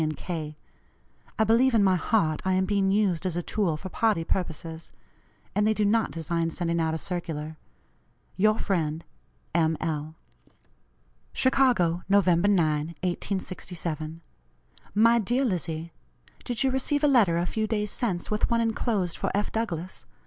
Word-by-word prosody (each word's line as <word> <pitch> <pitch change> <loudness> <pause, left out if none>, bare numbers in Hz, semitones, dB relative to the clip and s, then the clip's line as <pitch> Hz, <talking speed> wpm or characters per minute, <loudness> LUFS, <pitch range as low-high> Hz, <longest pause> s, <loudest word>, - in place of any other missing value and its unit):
& - - +2
K. 155 -4 -5 0.8
I 220 - +4
believe 230 +3 +4
in 215 - +5
my 190 -1 +4
heart 170 -4 +1
I 190 - +1
am 190 0 +2
being 200 0 +1
used 195 -5 +1
as 185 -3 -1
a 175 - -2
tool 175 -7 0
for 190 - -8
party 215 -4 +1
purposes; 165 -2 -4 0.6
and 210 +1 +2
they 220 - +2
do 210 - +1
not 225 +2 +2
design 165 0 -2
sending 170 0 -1
out 160 0 0
a - - -1
circular. 160 -3 -4 0.8
"Your 215 +2 +3
friend, 165 -6 -1 0.5
M. 160 -1 +2
L." 155 -1 -3 1.2
"CHICAGO, 245 -11 +3
Nov. 200 -2 +4
9, 175 -2 +4
1867. 170 -1 -2 0.7
"MY 230 +2 +5
DEAR 245 +6 +1
LIZZIE: 170 - -3 0.5
Did 245 0 -1
you 265 - +2
receive 285 +3 0
a - - +6
letter 220 -12 +4
a 170 - 0
few 220 +4 -1
days 210 -2 -1
since, 190 -7 -2
with 210 - +1
one 235 - +2
enclosed 220 -5 0
for - - -1
F. 205 +1 -1
Douglass? 185 -6 -4
185 Hz, 155 wpm, -26 LUFS, 165-215 Hz, 1.2 s, a